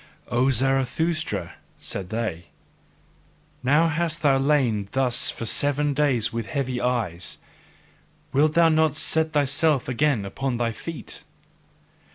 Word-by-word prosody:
"O 125 +2 +2
Zarathustra," 135 +6 0 0.2
said 95 -2 -5
they, 110 -7 -3 1.2
"now 145 +6 +3
hast 165 0 -1
thou 135 -2 +4
lain 130 -8 +1
thus 130 -2 +3
for 115 - -5
seven 145 +4 +2
days 135 -7 +1
with 115 -1 -4
heavy 130 -4 -3
eyes: 110 -9 -2 1.0
wilt 150 +3 +3
thou 165 -1 +5
not 155 -1 +2
set 160 0 +1
thyself 145 0 +2
again 130 -4 0
upon 125 +5 -3
thy 115 -1 -1
feet? 165 +8 -6
135 Hz, 120 wpm, -24 LUFS, 120-150 Hz, 1.2 s, thou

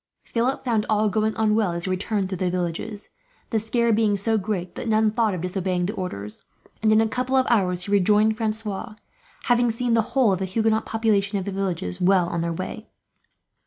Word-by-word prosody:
Philip 250 +4 -1
found 225 -4 +1
all 215 0 +2
going 215 +1 0
on 220 -1 +2
well, 210 -5 +1
as 170 0 -4
he 185 - -2
returned 195 +1 -1
through 185 -2 -5
the 185 - +1
villages, 180 +4 -4 0.4
the 225 - +2
scare 230 +1 +1
being 210 -2 +2
so 220 +3 0
great 195 -4 -2
that - - -6
none 220 -1 +3
thought 220 -3 +1
of 175 - -5
disobeying 180 0 -1
the 200 - -2
orders; 105 - -6 0.4
and 215 -1 +3
in 215 0 +5
a 225 - +2
couple 250 +3 -1
of 260 -1 +4
hours 180 -5 +2
he 200 - -6
rejoined 210 +2 +4
Francois, 215 -1 -3 0.5
having 240 -1 +3
seen 235 +1 -1
the 230 - +4 0.2
whole 245 -6 +5
of 185 - -2
the 190 - -1
Huguenot 220 +3 0
population 210 -2 +1
of 190 - -3
the 200 - -3
villages 180 - -3
well 180 -1 +4
on 170 -1 -2
their 170 0 -1
way. 185 +6 -6
210 Hz, 210 wpm, -24 LUFS, 185-225 Hz, 0.5 s, in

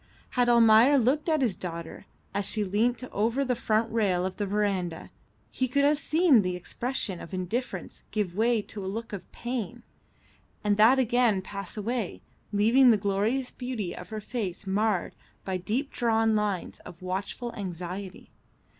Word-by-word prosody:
Had 245 -1 +2
Almayer 235 +3 +6
looked 275 +6 +2
at 310 -3 +2
his 220 -7 +1
daughter 170 -2 -7 0.3
as 200 -1 0
she 215 - +1
leant 225 +5 0
over 230 +7 0
the 250 -1 0
front 225 -1 0
rail 190 -5 +1
of 185 - -4
the 205 - -2
verandah 195 -5 -1 0.4
he 260 - -1
could 280 +3 +1
have 290 0 +3
seen 310 - +4
the 180 -2 -2
expression 205 +1 -3
of 175 - -7
indifference 205 +8 -4
give 200 -5 -2
way 225 0 +2
to 205 -1 -7
a - - -4
look 225 +2 -5
of 190 -3 -7
pain, 240 -1 -5 0.8
and 205 -1 +2
that 225 +5 +6
again 240 -5 +2
pass 200 +1 -7
away, 210 - -3 0.3
leaving 230 +6 +5
the 225 - +6
glorious 205 +6 0
beauty 245 -8 -4
of 180 - -9
her 215 -1 -5
face 210 -4 -4
marred 200 -1 0 0.3
by 190 -1 -1
deep 230 +10 -2
drawn 225 -2 +2
lines 210 -4 -2
of 175 +1 -12
watchful 195 +6 -4
anxiety. 185 0 -6
215 Hz, 165 wpm, -28 LUFS, 190-245 Hz, 0.8 s, Almayer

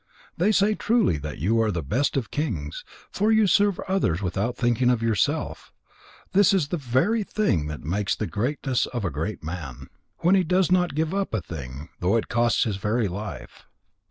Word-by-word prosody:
They 185 +6 +2
say 210 0 +3
truly 215 - +1
that 75 0 -6
you 110 +9 +1
are 110 - +2
the 85 -6 -2
best 135 - 0
of 120 -6 -3
kings, 85 - -3 0.3
for 210 +3 +1
you 220 -1 +5
serve 200 +1 +3
others 185 - 0
without 100 +5 -2
thinking 120 0 +2
of 120 -2 +1
yourself. 110 -3 -1 0.6
This 195 0 +5
is 155 -7 0
the 175 - -1
very 140 - +1
thing 110 - 0
that 75 -1 -6
makes 95 +7 -1
the 110 - -3
greatness 125 +5 -1
of 120 -5 -4
a 85 - -1
great 80 +7 -4
man, 80 -6 -7 0.3
when 175 +3 +4
he 190 -1 +4
does 180 +1 +2
not 180 -5 +2
give 160 +2 0
a 200 0 +1
thing 70 -7 -7
up, 80 - -11
though 90 +5 +2
it 115 - -3
costs 120 -1 +2
his 105 -4 -2
very 105 +2 0
life." 100 +3 -7
120 Hz, 190 wpm, -25 LUFS, -, 0.6 s, you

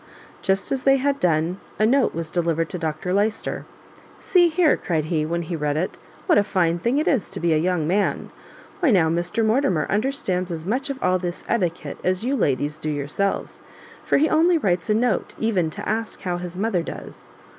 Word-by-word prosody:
Just 195 0 0
as 270 - 0
they 270 0 +4
had 280 +1 0
done, 170 +2 +1 0.2
a 215 - +3
note 265 +3 +2
was 165 -1 -4
delivered 165 -2 0
to 180 - -4
Dr 160 +2 -2
Lyster; 210 +2 -1 0.5
"see 355 -2 +4
here," 330 -1 +3
cried 160 -4 -2
he, 155 -1 -1
when 170 +1 -1
he 170 - -5
had 160 - -4
read 150 0 0
it, 175 +4 -2 0.3
"what - - +5
a - - +3
fine 175 -4 +1
thing 235 +10 +1
it 305 - 0
is 255 -9 +1
to - - -7
be 170 -1 +2
a - - +3
young 175 -2 0
man! 195 +4 0 0.5
Why 350 -6 +3
now, 180 -8 +4
Mr 175 +7 0
Mortimer 220 - +2
understands 200 - -1
as 160 -1 -5
much 255 +9 -1
of 275 - -3
all 185 0 +2
this 175 -1 -4
etiquette 180 -8 -2
as 185 +4 0
you 270 +2 +1
ladies 145 - 0
do 155 - -3
yourselves; 150 +7 -2 0.4
for - - +2
he 310 - +4
only 335 +3 +4
writes 180 - 0
a 210 - +3
note 235 -2 0
even 195 -8 +1
to - - -7
ask 220 +1 -3
how 180 -2 -2
his 180 0 -6
mother 200 -3 0
does." - - -9
185 Hz, 210 wpm, -23 LUFS, 165-230 Hz, 0.5 s, what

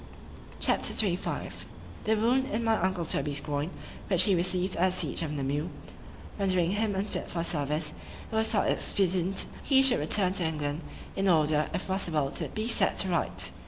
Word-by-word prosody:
C - - +3
H - - +1
A - - -3
P. 195 -5 +3
XXV 180 - -5 0.4
THE 220 - +3
wound 245 +5 +2
in 230 0 -2
my 225 -1 +3
uncle 185 -2 0
Toby's 145 -1 +2
groin, 145 +2 -3 0.4
which 185 -2 +6
he 200 - +3
received 180 +1 +1
at 185 +2 +2
the - - -4
siege - - -1
of 160 -3 -3
Namur, 145 +3 -2 0.7
rendering 185 -3 +1
him 205 0 0
unfit 195 +2 -3
for - - -6
the 165 - 0
service, 150 -1 -1 0.4
it - - -4
was 220 0 +2
thought 215 - +2
expedient 185 -1 +1 0.2
he 270 -1 +4
should 265 -2 +4
return 180 +5 +2
to 190 - 0
England, 150 -1 -2 0.3
in 195 0 0
order, 155 -3 +3
if - - -3
possible, 165 -7 -1
to - - -3
be 215 - -3
set 235 - +2
to 190 - +1
rights. 95 - -1
180 Hz, 195 wpm, -28 LUFS, 155-200 Hz, 0.7 s, which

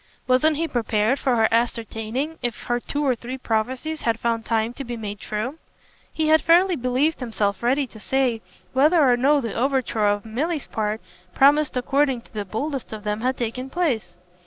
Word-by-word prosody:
Wasn't 285 +4 +3
he 330 +1 0
prepared 230 0 +1
for 255 -2 +1
her 225 -1 +4
ascertaining 230 +5 -1
if 240 -3 -3
her 240 0 0
two 290 +4 -3
or 265 - +3
three 245 +2 -6
prophecies 260 +7 -2
had 230 -1 0
found 230 -1 -1
time 225 0 0
to 275 - -6
be 240 -2 -5
made 205 -2 -6
true? 245 +11 -4 0.5
He 315 -1 0
had 315 0 +6
fairly 350 +2 +4
believed 255 +4 0
himself 215 -5 -1
ready 265 +4 +2
to 225 -3 -14
say 250 -1 0 0.3
whether 300 +6 +4
or 245 - +5
no 280 +4 +3
the 230 -5 -4
overture 250 -4 +1
on 205 0 +1
Milly's 290 +8 -2
part 215 0 -2 0.3
promised 285 0 +4
according 270 0 +1
to - - -23
the 210 -2 -3
boldest 265 +7 -4
of 215 -1 -7
them 210 0 -2
had 255 +2 0
taken 250 +3 -3
place. 240 - -1
245 Hz, 185 wpm, -23 LUFS, 225-280 Hz, 0.5 s, had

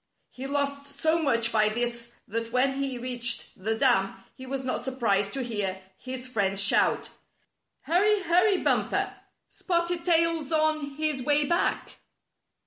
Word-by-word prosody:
He 260 +1 -7
lost 280 0 -1
so 315 +3 0
much 230 -6 +1
by 215 -1 +3
this 235 +1 -3
that 230 +2 -4
when 270 +2 +1
he 270 -2 -2
reached 240 -1 -2
the 220 +2 0
dam, 220 -7 +2 0.2
he 260 - -11
was 270 0 -3
not 255 - -2
surprised 225 -6 0
to 270 - -2
hear 205 -5 -2 0.2
his 255 +3 -7
friends 200 -6 -1
shout: 200 - +3 0.7
"Hurry! 400 +4 +2
Hurry, 365 +4 +3
Bumper! - - +1 0.3
Spotted 340 -1 -2
Tail's 335 -3 +2
on 310 -3 0
his 305 -3 -1
way 290 +2 +3
back! 340 +4 -1
265 Hz, 140 wpm, -27 LUFS, 235-310 Hz, 0.7 s, by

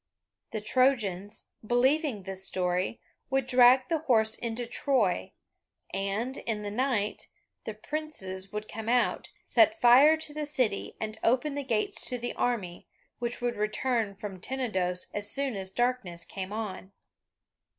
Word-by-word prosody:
The 215 - -4
Trojans, 210 -6 +1
believing 250 - +2
this 190 0 -5
story, 180 +2 -1 0.3
would 270 -1 +1
drag 255 +1 +6
the 325 +2 0
horse 220 -7 +2
into 235 +1 -3
Troy, 230 - 0 0.6
and, 200 +7 -2
in 215 -2 -3
the 205 - -4
night, 225 -3 -1 0.4
the 220 - -5
princes 210 -9 -5
would 210 0 -5
come 220 +1 -5
out, 245 0 +1
set 330 0 +4
fire 280 +4 +7
to 315 -1 -5
the 300 -1 -3
city, 250 -9 0
and 220 0 -5
open 260 +5 +2
the 285 - -2
gates 230 -5 +1
to 250 - -1
the 240 0 -4
army, 200 -8 -2 0.3
which 240 +1 -3
would 240 0 -1
return 215 0 -1
from 195 -2 -7
Tenedos 190 -9 -2
as 205 0 -1
soon 275 0 +1
as 190 -1 -4
darkness 210 -7 -1
came 190 0 -6
on. 200 -3 -5
225 Hz, 145 wpm, -29 LUFS, 200-260 Hz, 0.6 s, fire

